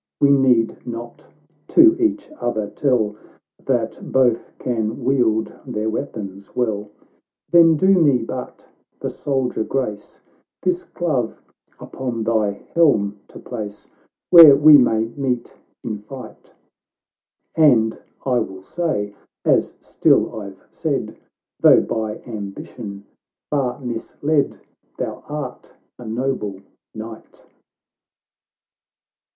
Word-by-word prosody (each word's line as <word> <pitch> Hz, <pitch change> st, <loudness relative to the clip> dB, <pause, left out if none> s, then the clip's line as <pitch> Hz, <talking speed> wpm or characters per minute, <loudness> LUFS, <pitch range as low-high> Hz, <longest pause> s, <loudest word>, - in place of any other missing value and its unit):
We 140 Hz, -, +5 dB
need 125 Hz, -5 st, +2 dB
not 120 Hz, 0 st, -8 dB, 0.4 s
to 330 Hz, 0 st, +6 dB
each 320 Hz, -2 st, 0 dB
other 110 Hz, -4 st, -2 dB
tell, 110 Hz, -3 st, 0 dB, 0.5 s
That -, -, -1 dB
both 125 Hz, -3 st, +2 dB
can 115 Hz, 0 st, -3 dB
wield 120 Hz, -4 st, +1 dB
their 110 Hz, +1 st, -3 dB
weapons 100 Hz, -6 st, -6 dB
well; 105 Hz, -4 st, -1 dB, 0.6 s
Then 165 Hz, -2 st, +6 dB
do 190 Hz, -, +2 dB
me 140 Hz, -5 st, +5 dB
but 125 Hz, +2 st, -7 dB, 0.3 s
the -, -, -4 dB
soldier 130 Hz, -5 st, -2 dB
grace, 110 Hz, -5 st, -4 dB, 0.4 s
This 180 Hz, -1 st, -1 dB
dove 140 Hz, -10 st, -1 dB, 0.4 s
upon 120 Hz, -4 st, -5 dB
thy 110 Hz, -3 st, 0 dB
helm 105 Hz, -12 st, +3 dB
to -, -, -13 dB
place 105 Hz, -4 st, -7 dB, 0.4 s
Where 165 Hz, -5 st, +11 dB
we 150 Hz, +2 st, +8 dB
may 115 Hz, -5 st, +4 dB
meet 125 Hz, -2 st, -3 dB, 0.3 s
in 110 Hz, -3 st, -4 dB
fight; 115 Hz, +2 st, -11 dB, 1.0 s
And 120 Hz, -9 st, +4 dB, 0.3 s
I 125 Hz, -2 st, +2 dB
will 95 Hz, -4 st, -6 dB
say, 105 Hz, -, -2 dB, 0.3 s
as -, -, +2 dB
still 110 Hz, -, +1 dB
I've 100 Hz, -2 st, -10 dB
said, -, -, -3 dB, 0.4 s
Though -, -, +7 dB
by 110 Hz, -1 st, -4 dB
ambition 100 Hz, -2 st, -8 dB, 0.5 s
far 135 Hz, -4 st, -1 dB
misled, 140 Hz, +4 st, -2 dB, 0.4 s
Thou -, -, -5 dB
art 145 Hz, -4 st, -7 dB, 0.2 s
a 120 Hz, -, -9 dB
nob.e 110 Hz, -5 st, -3 dB, 0.3 s
knight." 110 Hz, 0 st, -10 dB
120 Hz, 105 wpm, -21 LUFS, 110-140 Hz, 1.0 s, Where